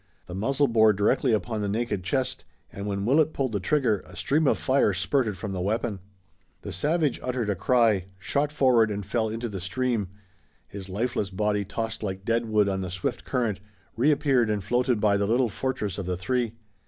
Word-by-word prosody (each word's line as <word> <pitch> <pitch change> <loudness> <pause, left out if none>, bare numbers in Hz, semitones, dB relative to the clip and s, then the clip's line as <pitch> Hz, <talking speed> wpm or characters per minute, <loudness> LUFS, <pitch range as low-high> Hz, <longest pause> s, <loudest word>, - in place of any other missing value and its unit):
The 90 - -9
muzzle 135 +9 +1
bore 110 -2 +5
directly 120 +6 +2
upon 110 0 -1
the 100 - -1
naked 105 -3 -1
chest, 130 +5 -1 0.3
and 100 +1 -5
when 100 -1 -2
Willet 150 +5 +3
pulled 130 -3 -1
the 105 - -1
trigger 115 -1 +1
a 90 - -13
stream 150 +6 +1
of - - +3
fire 130 -6 +2
spurted 105 +2 0
from 100 +2 -5
the 95 -2 -3
weapon. 105 +1 -1 0.6
The - - -5
savage 150 - 0
uttered 125 -4 -1
a - - -1
cry, 110 -2 +3
shot 140 +10 -1
forward 125 -7 +4
and 100 -1 -4
fell 110 +2 0
into 115 +2 -3
the 100 -4 -6
stream. 115 +2 -1 0.6
His 95 -1 -9
lifeless 105 0 -1
body 105 +1 0
tossed 115 +3 -4
like 95 -2 -4
dead 115 0 +1
wood 105 -2 +3
on 95 -1 -1
the 90 - -4
swift 90 0 -3
current, 115 -6 -1 0.4
reappeared 135 -2 +3
and 105 -2 -1
floated 120 +2 +1
by 105 -1 +3
the 100 0 0
little 120 +2 +2
fortress 105 -4 -3
of 95 - -4
the 90 -1 -1
three. 115 +4 -1
110 Hz, 195 wpm, -26 LUFS, 100-125 Hz, 0.6 s, bore